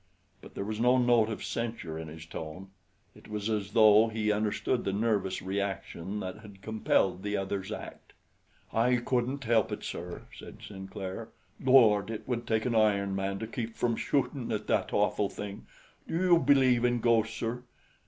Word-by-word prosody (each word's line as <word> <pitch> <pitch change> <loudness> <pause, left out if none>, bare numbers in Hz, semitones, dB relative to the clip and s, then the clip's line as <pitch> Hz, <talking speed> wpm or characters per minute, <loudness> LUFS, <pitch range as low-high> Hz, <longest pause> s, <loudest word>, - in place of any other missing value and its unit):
But - - -14
there 100 - -3
was 110 +1 -4
no 125 +2 +4
note 120 -3 +4
of 110 - -5
censure 115 -9 -4
in 80 - -6
his 80 +1 -9
tone. 85 +4 -8 0.4
It - - -16
was 105 +1 -3
as 105 -2 -2
though 110 -1 +7
he 110 -1 0
understood 110 +4 0
the 95 - -1
nervous 100 -2 0
reaction 95 0 -3
that 95 +2 -6
had 100 -3 -14
compelled 100 -4 +1
the 105 +1 -2
other's 95 +1 -3
act. 110 - -8 0.6
"I 120 +3 +3
couldn't 125 +3 -1
help 115 -2 +2
it, - - -5
sir," - - -6
said - - -11
Sinclair. 95 -1 -7 0.3
"Lord, 115 -6 +5
it 110 -1 -6
would 120 -2 -2
take 110 -1 +1
an 125 - 0
iron 100 -3 +2
man 95 0 -2
to 110 - -4
keep 115 0 -5
from 120 -1 0
shootin' 135 -1 -1
at 110 -1 -2
that - - 0
awful 100 - +1
thing. 100 -1 -7 0.4
Do - - -3
you 175 -1 +4
believe 130 -4 +4
in 120 0 +2
ghosts, 115 -1 +2
sir?" 115 +2 -3
110 Hz, 175 wpm, -30 LUFS, 100-120 Hz, 0.6 s, though